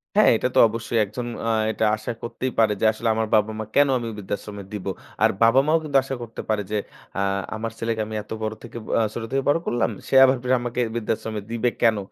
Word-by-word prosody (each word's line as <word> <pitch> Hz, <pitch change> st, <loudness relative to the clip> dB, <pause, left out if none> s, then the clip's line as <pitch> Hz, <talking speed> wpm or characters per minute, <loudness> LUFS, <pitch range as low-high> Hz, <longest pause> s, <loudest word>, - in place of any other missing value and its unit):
হ্যাঁ। -, -, +6 dB
এটা -, -, 0 dB
তো -, -, +6 dB
অবশ্যই 115 Hz, +1 st, -3 dB
একজন 120 Hz, +5 st, -6 dB, 0.2 s
অ্যা 115 Hz, -, +1 dB, 0.2 s
এটা 110 Hz, +1 st, 0 dB
আশা 110 Hz, +3 st, -5 dB
করতেই 130 Hz, +2 st, -3 dB
পারে 110 Hz, -2 st, +4 dB
যে, -, -, +3 dB
আসলে 115 Hz, +1 st, -3 dB
আমার 110 Hz, 0 st, 0 dB
বাবা 110 Hz, 0 st, +3 dB
মা, -, -, -2 dB
কেন 145 Hz, 0 st, +6 dB
আমি 120 Hz, -1 st, -4 dB
ঐ -, -, -8 dB
বৃদ্ধাশ্রমে 100 Hz, 0 st, -5 dB
দিব। 105 Hz, -3 st, -5 dB, 0.4 s
আর -, -, +6 dB
বাবা 115 Hz, +3 st, +6 dB
মাও 160 Hz, +1 st, +4 dB
কিন্তু 145 Hz, -3 st, +2 dB
আশা 135 Hz, 0 st, -4 dB
করতে 115 Hz, -1 st, -7 dB
পারে 105 Hz, -1 st, +1 dB
যে, 105 Hz, -, +1 dB, 0.4 s
অ্যা 95 Hz, -, -1 dB, 0.3 s
আমার 115 Hz, +1 st, -4 dB
ছেলেকে 115 Hz, -1 st, -1 dB
আমি 110 Hz, 0 st, -6 dB
এত -, -, -23 dB
বড় 110 Hz, 0 st, -2 dB
থেকে 120 Hz, 0 st, -9 dB, 0.2 s
অ্যা 115 Hz, -, +3 dB
ছোট 120 Hz, -, -4 dB
থেকে 135 Hz, 0 st, 0 dB
বড় 145 Hz, -, +3 dB
করলাম। 120 Hz, -1 st, +1 dB, 0.2 s
সে -, -, 0 dB
আবার 130 Hz, 0 st, +4 dB, 0.3 s
আমাকে 120 Hz, 0 st, -2 dB
বৃদ্ধাশ্রমে 110 Hz, -1 st, -2 dB
দিবে 115 Hz, +1 st, +1 dB
কেন? 115 Hz, -2 st, +4 dB
115 Hz, 230 wpm, -23 LUFS, 110-120 Hz, 0.4 s, হ্যাঁ